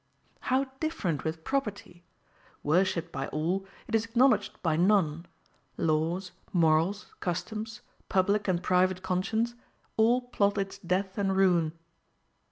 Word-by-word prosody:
How 260 +1 +1 0.2
different 225 - -1
with 160 0 -3
property! 210 -9 -3 0.6
Worshipped 170 +1 +1
by 135 -2 -3
all, 180 +6 -1 0.2
it - - -8
is 225 -1 +3
acknowledged 245 +3 +2
by 165 -3 +2
none: 170 -2 +2 0.5
laws, 165 +3 0 0.2
morals, 170 +4 +2
customs, 215 +4 -4 0.3
public 200 +2 +2
and 180 -2 +1
private 185 +1 +2
conscience, 220 +6 0 0.4
all 230 +3 +5
plot 205 -5 0
its 195 0 -3
death 190 +2 -1
and 195 -1 +1
ruin. 175 -5 +3
190 Hz, 120 wpm, -29 LUFS, 170-210 Hz, 0.6 s, all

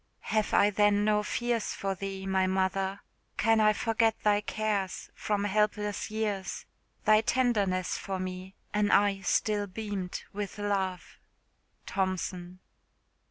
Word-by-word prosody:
"Have 215 -1 +1
I 205 +1 +5
then 205 0 +3
no 210 -1 +3
fears 235 +1 -1
for 195 0 -2
thee, 195 0 -5
my 190 -1 +2
mother? 190 +1 0 0.4
Can 225 -1 +3
I 215 0 +6
forget 225 +1 +1
thy 210 -1 +3
cares, 210 -3 -2
from 205 -1 -1
helpless 210 0 0
years 210 -3 -3 0.4
Thy 215 0 +6
tenderness 220 -7 +1
for 195 -1 -4
me? 185 +1 -6 0.2
an 210 0 +2
eye 200 -1 +3
still 205 +1 +1
beamed 200 -2 -4
With 205 0 -5
love!" 195 -3 -2 0.7
THOMPSON. 185 -1 -2
205 Hz, 125 wpm, -29 LUFS, 190-215 Hz, 0.7 s, I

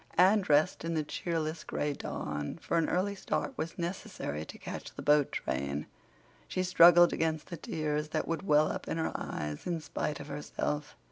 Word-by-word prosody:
Anne 190 +4 +6
dressed 155 0 +3
in 165 0 -1
the 155 - +1
cheerless 160 +1 -2
gray 145 0 -1
dawn, 75 - -4
for 170 - 0
an 165 - +1
early 190 +3 +1
start 200 +6 -2
was 165 -8 -4
necessary 170 - -4
to - - -10
catch - - -7
the - - -6
boat 145 -1 +4
train; 70 +3 -2 0.6
she 185 - -1
struggled 175 -1 +7
against 160 +1 -1
the 170 - -4
tears 150 -1 -2
that - - -1
would 165 - -1
well 155 -5 +4
up - - -5
in - - -2
her 160 - 0
eyes 75 - -4
in 170 -2 0
spite 150 -1 -3
of 145 - -7
herself. 150 0 -3
155 Hz, 185 wpm, -31 LUFS, 145-175 Hz, 0.6 s, struggled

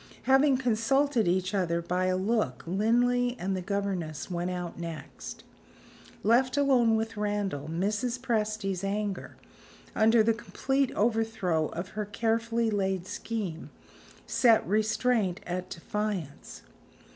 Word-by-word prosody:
Having 270 0 +4
consulted 250 0 +2
each 185 +2 +1
other 175 -4 +1
by 180 +2 -1
a 185 0 +1
look, 190 - 0
Linley 245 +6 +2
and 190 +1 -2
the 185 - -2
governess 190 -5 -3
went 175 +1 -2
out 175 -2 -5
next. 165 -2 -7 0.8
Left 255 +5 +3
alone 255 -5 +4
with 225 0 -2
Randal, 205 -8 -2
Mrs. 210 +8 -1
Presty's 215 -6 -1
anger, 200 -1 -3 0.6
under 225 0 +5
the 230 +1 +3
complete 270 +3 -1
overthrow 215 -8 +1
of 175 +3 -6
her 210 -1 -4
carefully 230 +2 0
laid 190 -3 0
scheme, 190 -5 -4 0.6
set 230 -3 +4
restraint 215 -1 +1
at 180 +1 -4
defiance. 185 -5 -4
210 Hz, 120 wpm, -29 LUFS, 185-230 Hz, 0.8 s, under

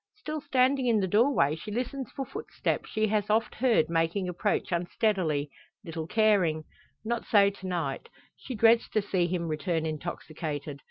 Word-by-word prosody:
Still 300 +5 -5
standing 265 -2 +2
in 225 -3 +3
the 190 - 0
door 210 - +3
she 190 +6 -9
listens 250 +3 -3
for 270 - -5
footsteps - - -3
she 215 0 +1
has 210 -1 0
oft 220 +2 +1
heard 240 -8 +2
making 165 +3 0
approach 180 +1 -1
unsteadily, 170 -4 0 0.3
little 165 -2 -5
caring. 190 -7 +2 0.4
Not 235 +1 -1
so 200 -2 +5
to 190 -1 -9
night. 165 -7 -3 0.3
She 260 - -7
dreads 230 +2 +4
to 215 - +3
see 185 -3 +1
him 175 -1 -2
return 160 +1 -1
intoxicated. 155 -2 -5
195 Hz, 160 wpm, -28 LUFS, 165-230 Hz, 0.4 s, so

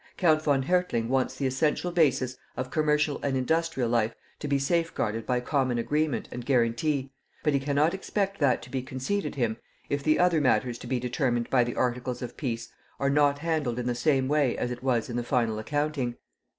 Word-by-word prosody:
Count 155 -4 +4
von 145 -3 +2
Hertling 160 -8 +1
wants 130 0 +1
the 135 - -2
essential 150 +6 0
basis 135 -7 +2 0.2
of 130 +1 -3
commercial 150 -2 +1
and 135 -2 0
industrial 160 -1 0
life 115 -1 +1 0.2
to 150 - -4
be 140 -1 +2
safeguarded 135 -7 -1
by 125 -1 +2
common 130 -1 0
agreement 150 +3 0
and 125 - -5
guarantee, 130 +3 +1 0.3
but 150 - +2
he 140 - +3
cannot 145 +4 +2
expect 195 +1 -2
that 140 -5 +2
to 125 - -12
be 130 - -1
conceded 130 +11 -3
him 115 -5 0 0.3
if 140 0 0
the 155 +2 +3
other 175 -3 +3
matters 125 -3 +1
to - - -9
be 125 0 0
determined 120 -1 0
by 125 -2 +5
the 120 0 -4
articles 125 0 -1
of 120 - -6
peace 115 -5 -3 0.3
are 140 0 +1
not 145 0 +3
handled 150 -6 -1
in 125 - -2
the 125 - +1
same 135 +1 +2
way 145 -3 +2
as 120 - -2
it 125 - -6
was 125 -3 +1
in 120 - -4
the 120 - -1
final 115 -3 0
accounting. 145 0 -1
135 Hz, 200 wpm, -27 LUFS, 125-150 Hz, 0.3 s, by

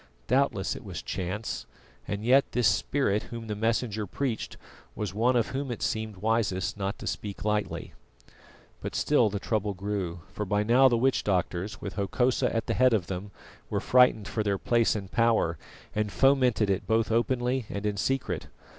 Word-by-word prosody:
Doubtless 125 -7 +1
it - - -9
was - - -6
chance, 95 +5 -4 0.4
and 105 +1 -3
yet 135 +3 +4
this 125 -3 +3
Spirit 110 -1 +1
Whom 115 -1 -6
the 105 -1 -3
Messenger 110 -1 -1
preached 120 +4 -3 0.4
was 105 -3 -3
one 120 +5 +2
of 120 -2 +2
Whom 135 +1 -3
it 120 - -4
seemed 110 -3 -2
wisest 105 -3 0
not 100 -1 -3
to - - -9
speak 100 -1 -4
lightly. 105 -1 -1 0.9
But - - -5
still 125 -7 +3
the 100 - -3
trouble 105 -1 -1
grew, 95 -3 -3
for 105 - -3
by 105 +1 +1
now 125 +5 +6
the 120 -2 +3
witch 130 +3 +2
doctors, 95 0 -1
with 100 - -6
Hokosa 125 +6 +1
at 115 - -1
the - - -1
head 130 -1 +4
of 95 -5 -1
them, 95 +3 -5 0.4
were - - 0
frightened 125 -5 +4
for 110 - -2
their 100 -2 0
place 115 +2 +2
and 100 -3 -5
power, 115 -9 +2 0.3
and 105 -1 -1
fomented 125 -7 +3
it 95 - -2
both 110 0 +2
openly 125 +1 +1
and 100 +1 -4
in 105 -1 0
secret. 100 -5 -1
110 Hz, 180 wpm, -28 LUFS, 100-120 Hz, 0.9 s, now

